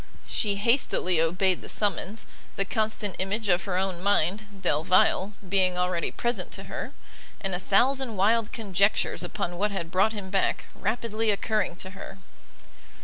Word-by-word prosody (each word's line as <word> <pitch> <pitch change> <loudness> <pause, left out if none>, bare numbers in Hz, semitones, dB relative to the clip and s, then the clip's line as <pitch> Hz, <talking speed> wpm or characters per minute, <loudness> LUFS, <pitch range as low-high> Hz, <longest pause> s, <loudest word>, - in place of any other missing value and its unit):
She 205 -2 +1
hastily 200 - +2
obeyed 180 +3 +1
the - - -8
summons; 205 +1 -1 0.3
the 195 - 0
constant 215 -2 -1
image 200 +3 -1
of 175 0 +2
her 185 -3 -1
own 185 -2 -1
mind, 200 +1 +1
Delvile, 185 +5 +2
being 185 -1 +2
already 180 -1 0
present 235 -7 -2
to 195 +1 -3
her, 195 - -6 0.5
and 195 -2 -2
a 180 - -1
thousand 250 +5 +2
wild 220 +3 +3
conjectures 200 -4 +1
upon 175 0 -4
what 210 +1 +2
had 170 -5 -4
brought 195 +4 +3
him 195 -3 -6
back, 195 -1 +1
rapidly 225 -1 -1
occurring 210 -3 0
to 185 +1 -7
her. 195 0 -9
195 Hz, 150 wpm, -27 LUFS, 185-215 Hz, 0.5 s, wild